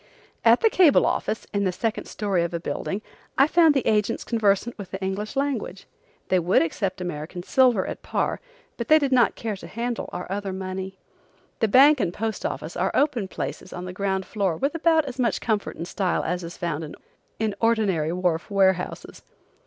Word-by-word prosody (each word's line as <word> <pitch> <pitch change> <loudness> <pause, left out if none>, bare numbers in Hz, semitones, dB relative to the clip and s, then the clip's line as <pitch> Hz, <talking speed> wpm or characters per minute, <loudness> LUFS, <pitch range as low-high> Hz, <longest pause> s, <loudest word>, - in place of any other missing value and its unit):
At 230 +1 +5
the 450 - +5
cable 345 -7 +5
office, 215 - -1
in 200 0 +1
the 185 - +1
second 220 +5 -2
story 200 -4 -1
of 170 0 -3
a - - -1
building, 195 +4 -4 0.3
I 275 - +7
found 320 -1 +4
the 270 - +1
agents 215 +1 +1
conversant 220 0 +1
with 200 -3 -9
the 190 - -5
English 195 +5 -3
language. 270 -9 -2 0.4
They 185 - +3
would 175 +1 +3
accept 185 +3 -3
American 175 0 -5
silver 245 -3 +3
at - - -6
par, - - -1 0.4
but 235 - -4
they 310 - +7
did 280 -3 0
not 250 -2 +4
care 220 -2 -3
to - - -10
handle 235 +1 -4
our 180 - -5
other 200 -1 -3
money. 190 0 -5 0.6
The 225 - +3
bank 275 +6 +6
and 170 - 0
post 220 +4 -3
office - - -6
are - - +1
open 250 -9 +1
places 185 - -6
on 180 - -6
the 180 - -6
ground 190 0 -1
floor 195 -6 -1
with 275 +2 0
about 325 -1 +3
as 260 -1 -7
much 240 -2 +1
comfort 215 -3 -1
and 170 - -5
style 185 -1 -1
as 180 +2 -2
is 170 +1 -8
found 165 -4 -4 0.4
in 220 -2 0
ordinary 205 -9 +2
wharf 175 -1 -1
warehouses. 190 -3 0
200 Hz, 190 wpm, -24 LUFS, 185-235 Hz, 0.6 s, I